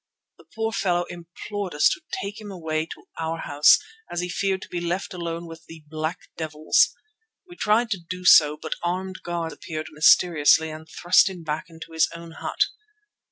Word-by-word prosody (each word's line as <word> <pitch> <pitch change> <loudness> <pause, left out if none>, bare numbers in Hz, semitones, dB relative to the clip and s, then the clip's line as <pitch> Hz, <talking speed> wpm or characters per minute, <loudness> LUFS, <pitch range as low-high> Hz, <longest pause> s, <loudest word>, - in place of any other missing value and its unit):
The - - -18
poor 225 0 -1
fellow 180 -5 +1
implored 175 +2 -6
us 150 - +5
to - - -3 0.2
take 205 +2 -6
him 210 - -8
away 160 -4 -3
to - - -10 0.2
our 165 0 -2
house, 145 +1 +6 0.3
as 175 - -2
he 180 - -3
feared 195 +1 -1
to - - -10
be 175 - -3
left 180 +4 -2
alone 170 -1 -4
with 165 0 -12
"the 160 -1 -12
black 155 +2 -3 0.2
devils." 155 -1 +2 0.5
We 350 - -12
tried 230 -3 +2
to 195 - -1
do 180 0 -5
so, 150 -4 +7
but - - -3
armed 185 +2 -3
guards 170 -2 -3
appeared 155 -2 -6
mysteriously 155 0 +5
and 155 +1 -10
thrust 180 +3 +4
him 180 -3 -9
back 155 0 -3
into 165 0 -11
his 160 0 +2
own 170 0 -9
hut. - - -6
170 Hz, 185 wpm, -24 LUFS, 160-185 Hz, 0.5 s, so